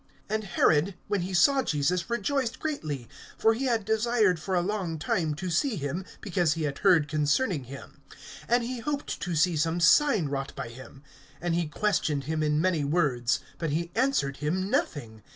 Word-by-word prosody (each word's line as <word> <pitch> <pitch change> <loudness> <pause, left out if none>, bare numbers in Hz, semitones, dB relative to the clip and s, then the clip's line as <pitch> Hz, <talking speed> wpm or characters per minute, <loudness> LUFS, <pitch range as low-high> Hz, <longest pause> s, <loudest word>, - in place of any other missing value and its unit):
(8)And 215 0 0
Herod, 175 0 +2
when 205 -2 0
he 180 +2 -4
saw 270 +10 +4
Jesus, 170 - 0
rejoiced 255 0 -1
greatly; 155 - -4 0.3
for 225 - +4
he 255 +4 -3
had 230 -5 0
desired 220 -4 +2
for 185 +4 -2
a 175 - +3
long 185 -4 -2
time 155 0 -1
to 180 +4 -4
see 230 - +1
him, 160 +3 -4 0.2
because 175 -6 +1
he 165 - -3
had 145 -2 -3
heard 175 -7 +4
concerning 150 - 0
him; 135 +3 -11 0.5
and 240 0 +3
he 245 +1 -4
hoped 285 +4 -4
to 175 -1 -2
see 165 +2 +3
some 165 +3 0
sign 210 - +4
wrought 135 -1 -4
by - - -5
him. 130 +3 -12 0.4
(9)And 175 0 -1
he 170 -1 0
questioned 150 -4 0
him 155 +3 -2
in 150 0 +1
many 170 -3 +1
words; 140 -6 +1 0.2
but 165 - -1
he 170 +4 -2
answered 225 - +1
him 185 +7 -2
nothing. 110 -7 -2
175 Hz, 185 wpm, -27 LUFS, 150-215 Hz, 0.5 s, saw